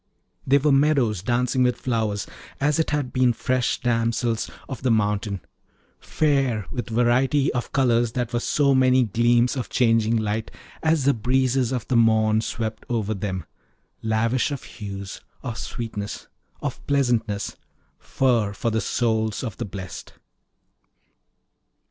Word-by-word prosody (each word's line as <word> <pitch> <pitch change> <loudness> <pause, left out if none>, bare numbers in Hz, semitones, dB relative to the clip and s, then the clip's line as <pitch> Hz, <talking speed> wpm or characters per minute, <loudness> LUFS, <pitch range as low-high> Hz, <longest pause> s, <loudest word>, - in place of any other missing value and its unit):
They 140 +2 +5
were 145 +1 +2
meadows 135 - +3
dancing 125 +4 0
with 125 -1 +2
flowers, 110 -5 -1 0.3
as 150 +3 +1
it 160 - +1
had 145 -4 -2
been 130 -2 +3
fresh 130 +1 0
damsels 115 -1 0 0.2
of 130 - -6
the 130 - +1
mountain, 105 -3 0 0.6
fair 135 -9 0
with 120 -2 -4
variety 125 +5 +2
of 125 - -3
colours 120 -4 +2
that 120 -1 -2
were 120 - +1
so 140 +3 +2
many 130 -1 +4
gleams 120 +3 +2
of 130 - -4
changing 115 -2 +2
light 110 0 -2 0.3
as 160 -3 +2
the 140 - +5
breezes 125 +2 +1
of 125 -3 -3
the 125 - +2
morn 110 -1 +4
swept 110 -1 -4
over 110 -3 -1
them; 95 -4 -4 0.6
lavish 115 +4 +1
of 140 -3 -5
hues, 100 -3 -7 0.2
of 120 -4 -4
sweetness, 110 -3 -5 0.4
of - - -4
pleasantness, 120 -7 0 0.4
fir 115 -6 +1
for 115 +3 -2
the 110 0 0
souls 110 -1 0
of 115 -6 -5
the 120 - -3
blest. 95 -2 -8
120 Hz, 140 wpm, -24 LUFS, 110-130 Hz, 0.6 s, They